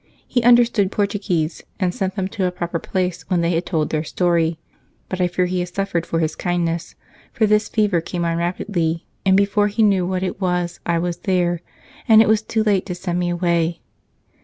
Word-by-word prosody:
He 245 - +1
understood 235 -4 +4
Portuguese 200 -6 -1 0.2
and 180 -3 0
sent 190 0 -2
them 190 -2 -1
to 195 -2 -2
a 180 - 0
proper 175 -1 -3
place 180 -1 -2
when 180 -3 +2
they 170 +1 +1
had 170 +1 -1
told 155 -4 -1
their 155 -1 0
story. 170 -1 +1 0.5
But 185 -1 -3
I 180 - +3
fear 180 +1 0
he 180 0 -1
has 175 0 -2
suffered 175 -2 -2
for 165 - -1
his 155 -1 -1
kindness, 170 -1 -2 0.4
for 220 - +2
this 210 0 +2
fever 205 -6 +1
came 170 +1 -3
on 165 0 0
rapidly, 170 -1 -1 0.2
and 190 0 +5
before 205 +1 +3
he 215 +2 +1
knew 195 -4 +3
what 185 0 -1
it 190 +1 -4
was 180 -1 -1
I 170 0 +2
was 175 0 -2
there, 175 -3 0 0.5
and 220 -1 +7
it 225 - +6
was 220 0 +3
too 220 0 -1
late 200 -3 +1
to 180 - -3
send 180 -1 -3
me 175 0 0
away. 170 -1 0
180 Hz, 210 wpm, -21 LUFS, 170-200 Hz, 0.5 s, and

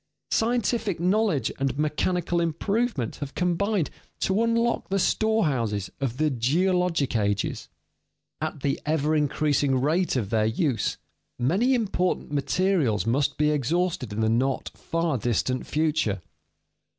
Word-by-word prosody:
Scientific 225 -4 +1
knowledge 180 - +1
and 135 -1 -1
mechanical 170 +3 0
improvement 170 - -1
have 145 -2 -6
combined 180 0 0 0.3
to 195 +3 +2
unlock 230 0 +1
the 195 - +1
storehouses 145 - +1
of 130 -3 -2
the 155 0 +2
geologic 165 +4 +1
ages. 100 -2 -1 0.7
At 155 -2 -3
the 140 0 -1
ever 155 0 +1
increasing 145 -2 +1
rate 160 +6 +1
of 110 -6 -2
their 110 -1 +2
use, 120 - 0 0.4
many 195 - +2
important 190 -9 -1
materials 145 - +1
must 135 +5 +1
be 150 0 +3
exhausted 150 - 0
in 105 +2 -2
the 110 - +2
not 130 +4 0
far 165 -5 -1
distant 120 +3 -1
future. 150 - 0
155 Hz, 125 wpm, -26 LUFS, 130-185 Hz, 0.7 s, be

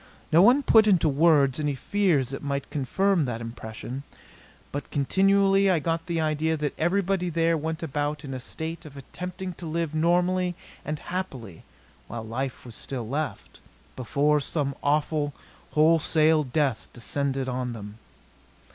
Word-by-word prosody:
No 165 - +6
one 250 +8 +6
put 220 -4 +6
into 180 -6 +4
words 145 -2 +4
any 145 -2 0
fears 170 -5 +1
that 135 - -5
might 140 -1 -3
confirm 165 +5 +1
that 120 -3 -3
impression; 115 +2 -7 0.7
but 145 - -5
continually 195 +6 +3
I 180 - +4
got 165 +2 -2
the 170 -2 -1
idea 160 +1 0
that 145 -1 -2
everybody 185 +1 +1
there 165 0 +2
went 160 +1 -3
about 145 0 -2
in 135 - -6
a 130 - -4
state 160 +6 -6
of 145 -3 -12
attempting 180 +6 -6
to 170 - -6
live 165 -1 -2
normally 175 +2 +2 0.3
and 150 0 -3
happily 135 - -6 0.4
while 115 -1 -6
life 125 +5 -4
was 120 - -9
still 120 +1 -5
left 150 +5 -4 0.4
before 145 +4 +1
some 140 0 -1
awful, 145 0 0 0.4
wholesale 155 0 +4
death 135 -2 -1
descended 135 +3 -2
on 125 -1 -2
them. 105 -1 -9
150 Hz, 145 wpm, -26 LUFS, 135-170 Hz, 0.7 s, No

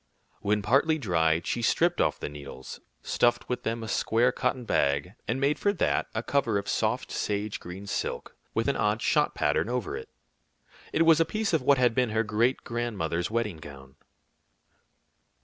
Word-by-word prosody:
When 105 0 0
partly 140 +9 +3
dried, 85 - +1
she 120 - -1
stripped 175 +8 +2
off - - +1
the - - -4
needles, 70 -3 -9 0.2
stuffed 120 0 +1
with 125 - -2
them 115 +1 -3
a - - -5
square 115 +3 +2
cotton 125 -1 -2
bag, 70 0 +1
and 120 +3 -1
made 140 +2 +1
for 205 - +2
that 190 - 0
a 110 - -1
cover 120 -7 +1
of 100 - -4
soft - - -1
sage 105 +1 -2
green 90 +3 -8
silk, 100 - -4 0.2
with - - +1
an - - +1
odd - - 0
shot - - +2
pattern - - +1
over 125 -5 -2
it. - - -8 0.8
It 165 - +3
was 165 -1 +6
a - - +6
piece 215 +3 -2
of 160 - +3
what 140 +2 +4
had 125 -2 +3
been 125 0 +1
her 110 +1 +1
great 115 +4 +1
grandmother's 100 -8 -2
wedding 110 -6 -1
gown. 70 -3 -12
115 Hz, 180 wpm, -28 LUFS, 90-125 Hz, 0.8 s, was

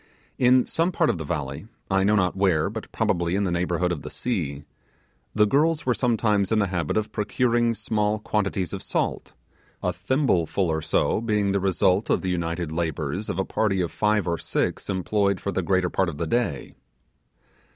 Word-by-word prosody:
In 125 0 +5
some 165 +3 0
part 165 -3 +2
of 85 - -5
the - - -3
valley 75 +2 -4 0.2
I 95 0 +3
know 105 +2 +3
not 90 -3 +1
where, 95 -5 +2
but - - -7
probably 85 +1 0
in 100 - +1
the 95 - 0
neighbourhood 90 0 0
of 80 -5 -3
the - - -7
sea 80 - -3 0.7
the 105 0 +5
girls 150 +7 +2
were 125 - +3
sometimes 110 -5 +1
in 110 - +3
the 105 - +3
habit 85 -1 -1
of 110 -1 -1
procuring 120 +2 +1
small 105 -1 0
quantities 100 -4 -2
of - - -4
salt, - - -2 0.5
a - - 0
thimble 95 - +1
full 95 -4 0
or 80 0 -1
so 105 - +1
being 105 -3 +1
the 100 - +1
result 95 +1 +2
of - - +1
the 95 - 0
united 85 -2 -2
labours 80 +3 -2
of - - -2
a 95 - 0
party 100 -3 0
of 85 -2 -1
five 105 -2 +1
or 85 -1 -1
six - - -2
employed 100 +1 0
for 100 - -3
the 95 - -1
greater 95 0 +1
part 95 -2 +1
of 75 - -7
the 85 - -2
day. 85 - -1
95 Hz, 195 wpm, -25 LUFS, 85-110 Hz, 0.7 s, In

